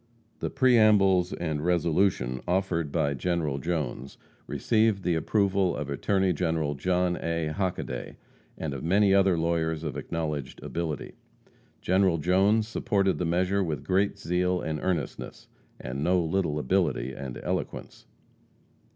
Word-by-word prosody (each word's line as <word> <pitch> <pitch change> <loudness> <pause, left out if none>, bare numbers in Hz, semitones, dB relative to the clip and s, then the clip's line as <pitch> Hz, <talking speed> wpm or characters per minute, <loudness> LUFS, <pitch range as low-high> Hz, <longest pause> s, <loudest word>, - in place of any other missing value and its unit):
The - - -2
preambles 105 -7 +4
and 80 -3 -3
resolution 85 -6 +1
offered 90 -4 0
by 70 0 +1
General 75 -1 -1
Jones 70 -5 -3 0.3
received 110 -3 +1
the 90 - +1
approval 95 +2 +1
of 70 -1 -4
Attorney 95 +5 +1
General 80 -4 -1
John 90 +4 0
A. 85 -1 -2
Hockaday, 85 -8 -3 0.4
and 75 -3 -4
of 70 - -6
many 95 +4 +3
other 95 -3 +4
lawyers 80 -1 0
of 75 -5 -4
acknowledged 75 -5 -4
ability. 80 -3 -4 0.7
General 95 -2 +2
Jones 95 +6 +2
supported 100 -4 0
the 90 - 0
measure 90 +4 +1
with 80 -4 -3
great 95 +2 +1
zeal 90 +1 0
and 80 -2 -3
earnestness, 85 -6 -3 0.3
and 70 +3 -4
no 90 +3 +3
little 85 -2 0
ability 65 -2 0
and 65 -1 -7
eloquence. - - -4
85 Hz, 130 wpm, -27 LUFS, 75-95 Hz, 0.7 s, preambles